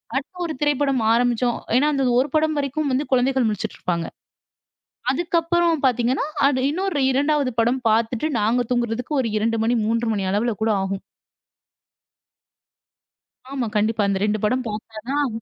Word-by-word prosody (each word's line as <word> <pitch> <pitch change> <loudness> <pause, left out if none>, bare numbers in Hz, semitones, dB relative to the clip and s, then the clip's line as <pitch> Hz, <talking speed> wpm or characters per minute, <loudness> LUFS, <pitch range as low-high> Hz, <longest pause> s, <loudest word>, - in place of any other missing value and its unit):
அடுத்த 280 +7 -3
ஒரு 320 - -3
திரைப்படம் 285 -3 +1
ஆரம்பிச்சோம் 240 0 +1 0.2
ஏன்னா, 295 +3 +3
அந்த 270 -1 +1
ஒரு 270 +3 +1
படம் 310 0 +2
வரைக்கும் 285 +1 -1
வந்து 280 +3 0
குழந்தைகள் 260 -1 +2
முழிச்சிட்டு 210 +1 -4
இருப்பாங்க. 170 -2 -2 1.1
அதுக்கு 340 +4 -1
அப்புறம் 335 -2 +1
பார்த்தீங்கன்னா, 250 +2 +1 0.4
இன்னொரு 360 -1 -1
2 285 -1 +1
படம் 240 +3 +1
பார்த்துட்டு 225 +5 +1
நாங்க 235 +4 +2
தூங்குறதுக்கு 240 +3 -1
ஒரு 230 - -2
2 225 +1 0
மணி, 240 +2 +2
3 230 +1 0
மணி 195 -2 -2
அளவுல 220 +3 0
கூட 220 - +2
ஆகும். 195 0 -3 2.5
ஆமா. 260 -4 -2
கண்டிப்பா. 215 +1 +1
அந்த 195 -1 +1
ரெண்டு 210 0 0
படம் 255 +3 0
பார்த்தா 215 +1 -7
தான். 290 -1 +1
250 Hz, 145 wpm, -22 LUFS, 225-285 Hz, 2.5 s, ஏன்னா